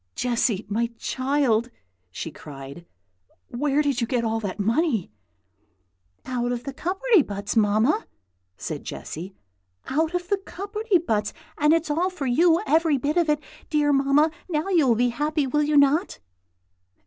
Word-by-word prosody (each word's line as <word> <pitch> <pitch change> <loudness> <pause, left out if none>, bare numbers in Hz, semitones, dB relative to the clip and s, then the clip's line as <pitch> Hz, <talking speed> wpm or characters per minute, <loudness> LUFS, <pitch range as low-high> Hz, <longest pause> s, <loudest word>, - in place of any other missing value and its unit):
"Jessy, 235 -4 0
my 230 +3 0
child!" 255 -4 0 0.4
she 125 - -6
cried, 140 +3 -10 0.6
"where 290 +3 +1
did 280 -4 0
you 235 - 0
get 245 -1 0
all 225 0 0
that 205 -2 -5
money?" 225 - +1 1.1
"Out 245 -1 -2
of 245 -1 -3
the 275 - -6
cupperty 385 - +2
buts, 200 -3 -4
Mamma!" 220 - +2 0.5
said - - -5
Jessy, 180 +5 -7 0.5
"out 320 +5 0
of 355 0 -2
the 405 - +2
cupperty 405 +2 -1
buts! 210 -10 -1 0.2
and 300 +1 +3
it's 325 -1 +2
all 345 +5 +1
for 360 -7 -5
you, 325 +7 +3
every 315 0 +3
bit 285 +4 -1
of 340 -3 +2
it! 300 0 +1 0.3
Dear 295 -1 +2
Mamma, 275 +3 +3 0.2
now 315 +2 -1
you 335 -7 +3
will 235 - +4
be 245 +2 +2
happy, 295 +4 -1
will 295 +3 +1
you 300 0 +2
not?" 285 +4 +3
280 Hz, 155 wpm, -24 LUFS, 230-320 Hz, 1.1 s, will